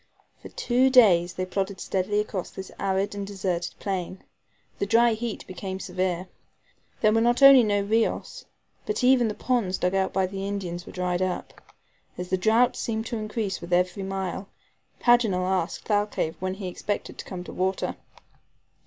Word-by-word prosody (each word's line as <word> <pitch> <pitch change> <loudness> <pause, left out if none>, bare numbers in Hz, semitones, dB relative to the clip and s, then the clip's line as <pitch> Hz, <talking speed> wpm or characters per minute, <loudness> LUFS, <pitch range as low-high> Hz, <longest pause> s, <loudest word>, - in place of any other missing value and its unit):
For - - -10
two 255 +2 +2
days 185 -9 +5
they 185 - -2
plodded 190 +1 -3
steadily 195 +2 -1
across 210 -3 -3
this 190 0 -9
arid 195 +1 0
and 200 -1 -5
deserted 185 -3 -3
plain. 185 -2 -4 0.6
The 200 - -1
dry 230 +2 +4
heat 225 0 -4
became 190 0 -6
severe. 185 -1 -2 0.7
There 215 - +5
were 225 - +3
not 240 +3 +2
only 275 -2 +10
no 205 -3 +1
RIOS, 220 +3 -1 0.4
but 425 -10 -1
even 250 -2 +5
the 210 - -3
ponds 230 -8 0
dug 180 +1 0
out 190 -1 +1
by 190 0 +1
the 195 +1 -4
Indians 180 -4 -4
were - - -8
dried 180 0 -1
up. 185 -1 -3 0.6
As 180 0 -5
the - - +4
drought 225 +6 +3
seemed 220 -1 -3
to 235 0 -3
increase 215 -3 -3
with 170 - -9
every 180 +2 +1
mile, 190 0 -4 0.5
Paganel 225 -7 +3
asked 185 -2 -1
Thalcave 205 -6 0
when 185 0 -2
he 195 -1 -6
expected 205 +3 -4
to - - -6
come 180 -2 -6
to - - -9
water. 190 +1 -1
195 Hz, 170 wpm, -26 LUFS, 185-220 Hz, 0.7 s, only